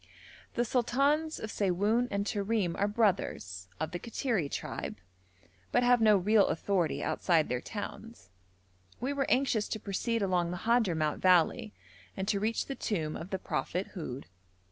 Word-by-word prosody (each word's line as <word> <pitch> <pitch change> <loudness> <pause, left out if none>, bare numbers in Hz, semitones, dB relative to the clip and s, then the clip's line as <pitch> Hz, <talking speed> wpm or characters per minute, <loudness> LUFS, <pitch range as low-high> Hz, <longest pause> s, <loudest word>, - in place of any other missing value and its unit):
The 240 - +1
sultans 275 +7 +1
of 220 - -5
Siwoun 205 +5 +1
and 200 0 -1
Terim 205 -4 0
are 200 - +3
brothers, 185 - 0
of 160 0 -2
the 175 - -4
Kattiri 225 - -1
tribe, - - -5 0.7
but - - +3
have 245 -1 +4
no 215 -2 +6
real 205 +2 +4
authority 175 0 0
outside 165 -4 +2
their 125 0 -1
towns. 225 - -8 0.7
We 265 +3 -1
were 280 -1 -1
anxious 250 -5 +2
to 220 - -3
proceed 215 +3 -1
along 180 -3 +1
the 180 +3 -6
Hadhramout 180 -11 +2
valley 185 +5 +3 0.4
and 190 0 -2
to 205 -2 +2
reach 220 +3 0
the 275 - -4
tomb 160 -12 -2
of 170 - -7
the 190 - -1
prophet 185 0 -3
Houd. 140 -8 -6
205 Hz, 155 wpm, -31 LUFS, 175-230 Hz, 0.7 s, no